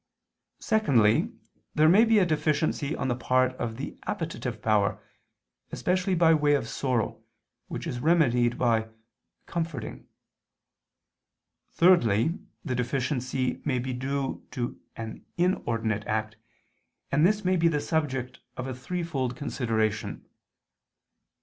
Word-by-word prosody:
_ -, -, -12 dB
Secondly, 125 Hz, -, +3 dB, 0.4 s
there 155 Hz, +1 st, +5 dB
may 195 Hz, +7 st, +7 dB
be 225 Hz, -1 st, +4 dB
a 195 Hz, -, +5 dB
deficiency 155 Hz, -2 st, 0 dB
on -, -, -2 dB
the 125 Hz, -, +1 dB
part 130 Hz, +1 st, +2 dB
of 115 Hz, -1 st, -3 dB
the 140 Hz, -, -6 dB
appetitive 130 Hz, -8 st, -3 dB
power, 105 Hz, -2 st, +1 dB, 0.7 s
especially 185 Hz, +1 st, 0 dB
by 165 Hz, -1 st, +5 dB
way 150 Hz, -2 st, +3 dB
of 125 Hz, -5 st, -2 dB
sorrow, 125 Hz, -3 st, -1 dB, 0.5 s
which -, -, -5 dB
is 120 Hz, -, -3 dB
remedied 125 Hz, -6 st, +3 dB
by 115 Hz, -2 st, +1 dB, 0.6 s
comforting. 165 Hz, -6 st, -4 dB, 1.6 s
Thirdly, 165 Hz, -, +3 dB, 0.3 s
the 130 Hz, -, -1 dB
deficiency 130 Hz, 0 st, -1 dB
may 135 Hz, -4 st, 0 dB
be 125 Hz, +1 st, -2 dB
due 135 Hz, +2 st, -3 dB
to 120 Hz, -1 st, -4 dB
an 110 Hz, -1 st, -7 dB
inordinate 115 Hz, -, 0 dB
act; 110 Hz, 0 st, -1 dB, 0.8 s
and 145 Hz, +2 st, +3 dB
this 205 Hz, +2 st, +3 dB
may 185 Hz, +1 st, +3 dB
be 170 Hz, -1 st, +3 dB
the 150 Hz, -3 st, +1 dB
subject 140 Hz, -5 st, -2 dB, 0.2 s
of 130 Hz, -, -3 dB
a 130 Hz, -, -4 dB
threefold 135 Hz, -3 st, -3 dB
consideration. 110 Hz, -7 st, -2 dB
130 Hz, 125 wpm, -27 LUFS, 120-160 Hz, 1.6 s, may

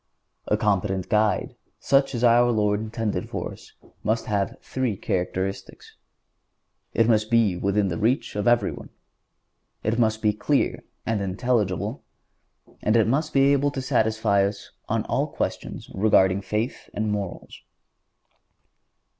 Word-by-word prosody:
A 105 Hz, -, +2 dB
competent 100 Hz, -3 st, 0 dB
guide, 105 Hz, -2 st, +1 dB, 0.2 s
such 135 Hz, -1 st, +2 dB
as 120 Hz, -, -2 dB
our 120 Hz, 0 st, +5 dB
Lord 105 Hz, -3 st, +1 dB
intended 110 Hz, 0 st, -3 dB
for -, -, -4 dB
us, -, -, -14 dB, 0.3 s
must 110 Hz, +1 st, 0 dB
have 100 Hz, -2 st, -1 dB
three 125 Hz, -6 st, -2 dB
characteristics. 95 Hz, +2 st, -3 dB, 1.0 s
It 115 Hz, -, +4 dB
must 110 Hz, -2 st, +2 dB
be 115 Hz, -5 st, +3 dB
within 100 Hz, +2 st, +1 dB
the 85 Hz, -, -3 dB
reach 115 Hz, +3 st, 0 dB
of 105 Hz, +1 st, -1 dB
everyone; 120 Hz, 0 st, +1 dB, 0.9 s
it 110 Hz, +3 st, 0 dB
must 110 Hz, -1 st, +1 dB
be 105 Hz, -1 st, +3 dB
clear 140 Hz, +7 st, 0 dB, 0.2 s
and 110 Hz, -2 st, 0 dB
intelligible; 100 Hz, -1 st, -1 dB, 0.8 s
it 110 Hz, +1 st, +3 dB
must 150 Hz, +7 st, 0 dB
be 140 Hz, 0 st, +4 dB
able 140 Hz, +1 st, +2 dB
to 140 Hz, -, -5 dB
satisfy 110 Hz, -4 st, +2 dB
us 100 Hz, +1 st, -4 dB, 0.2 s
on -, -, 0 dB
all -, -, 0 dB
questions -, -, -4 dB
relating 95 Hz, -1 st, +3 dB
to 95 Hz, -, -20 dB
faith 110 Hz, +5 st, -3 dB
and 105 Hz, 0 st, -1 dB
morals. 100 Hz, -3 st, -5 dB
110 Hz, 135 wpm, -24 LUFS, 100-120 Hz, 1.0 s, our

